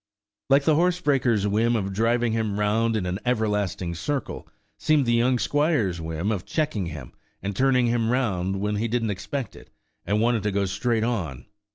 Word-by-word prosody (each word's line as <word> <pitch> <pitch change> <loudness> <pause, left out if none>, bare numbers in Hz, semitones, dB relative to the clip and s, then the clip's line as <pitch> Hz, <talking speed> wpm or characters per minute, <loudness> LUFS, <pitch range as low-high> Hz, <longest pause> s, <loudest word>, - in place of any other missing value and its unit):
Like 140 +1 +5
the 155 - +3
horsebreaker's 145 - +2
whim 110 +4 +2
of 100 -3 -2
driving 115 +3 +1
him 110 -2 -1
round 110 +2 +1
in 105 -4 -1
an 90 +2 -2
everlasting 105 -7 -1
circle, 135 - -4 0.3
seemed 155 -3 +3
the 120 - +2
young 125 +2 +3
squire's 125 - +1
whim 80 +5 -2
of 100 -4 -2
checking 115 - -1
him, 75 -6 -8 0.3
and 100 0 -3
turning 130 +1 +3
him 115 -1 +1
round 95 -7 0
when 105 +1 -1
he 115 +3 0
didn't 115 -1 0
expect 120 +7 -5
it, - - -14 0.3
and 105 +3 0
wanted 115 0 +2
to 105 +1 -1
go 100 0 0
straight 110 +4 0
on. 95 - -3
110 Hz, 180 wpm, -25 LUFS, 100-125 Hz, 0.3 s, Like